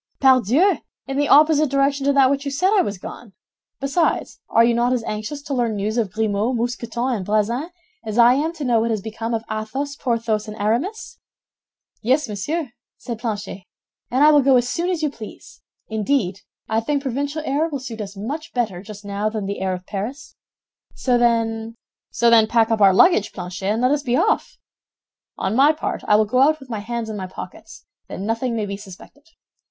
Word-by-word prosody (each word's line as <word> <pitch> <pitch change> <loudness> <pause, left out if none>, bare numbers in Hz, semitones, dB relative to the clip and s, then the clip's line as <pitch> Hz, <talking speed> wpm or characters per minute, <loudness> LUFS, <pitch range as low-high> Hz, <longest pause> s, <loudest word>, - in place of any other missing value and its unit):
"Pardieu! 265 - +4 0.3
In 270 0 -4
the 290 0 +2
opposite 305 0 +5
direction 275 0 +1
to 280 - +4
that 270 -1 +5
which 280 0 -1
you 285 - -3
said 365 +8 +1
I 410 - +5
was 205 - -3
gone. 205 +3 -10 0.5
Besides, 280 +5 0
are 230 - +5
you 235 0 +3
not 240 +2 +2
as 245 -3 -1
anxious 215 +8 -5
to 280 - -4
learn 240 -4 0
news 210 +2 -2
of 225 -6 0
Grimaud, 220 +3 0
Mousqueton, 240 +1 -2
and 195 - -5
Bazin 215 - 0 0.3
as 215 +1 -4
I 240 +1 +7
am 300 +5 0
to 315 -3 -6
know 240 -2 +3
what 230 +1 0
has 220 -2 0
become 225 +3 -4
of 225 - -3
Athos, 265 +7 -4
Porthos, 230 -5 -1
and 215 0 -8
Aramis?" 275 - -2 0.8
"Yes, 260 +7 +2
monsieur," 250 - -3 0.3
said 235 -3 -6
Planchet, 205 -5 -5 0.4
"and 260 +4 +2
I 305 - +8
will 295 -1 +6
go 270 0 +4
as 245 -1 +3
soon 345 +7 -1
as 345 -4 -1
you 300 - +1
please. 220 -5 -11 0.3
Indeed, 215 -3 -1 0.3
I 220 0 +1
think 280 +5 -1
provincial 285 +4 -2
air 290 +4 +1
will 290 - -3
suit 230 -4 -7
us 200 -1 -7
much 295 +11 -5
better 215 -8 -1
just 205 0 -11
now 200 +1 -1
than 215 -2 -4
the 200 0 -4
air 190 -1 0
of 180 0 -10
Paris. 235 +7 -6 0.6
So 250 -2 +1
then—" 225 -1 +1 0.3
"So 235 0 +2
then, 225 -2 +6
pack 230 0 +2
up 220 -1 +1
our 195 -1 +7
luggage, 215 - +4
Planchet, 185 +1 -5
and 225 +3 -1
let 255 - +4
us 295 0 +1
be 250 -2 0
off. 440 - 0 0.8
On 190 +3 -1
my 285 +4 +5
part, 310 - -4
I 210 - +5
will 215 +1 +4
go 250 +5 +1
out 310 +3 +4
with 270 -3 -12
my 220 - -2
hands 235 +2 -4
in 220 - -5
my 190 -2 -5
pockets, 185 - -10 0.2
that - - -7
nothing 230 +4 -1
may 215 -2 -1
be 200 0 -5
suspected. 200 - -14
235 Hz, 205 wpm, -21 LUFS, 215-280 Hz, 0.8 s, I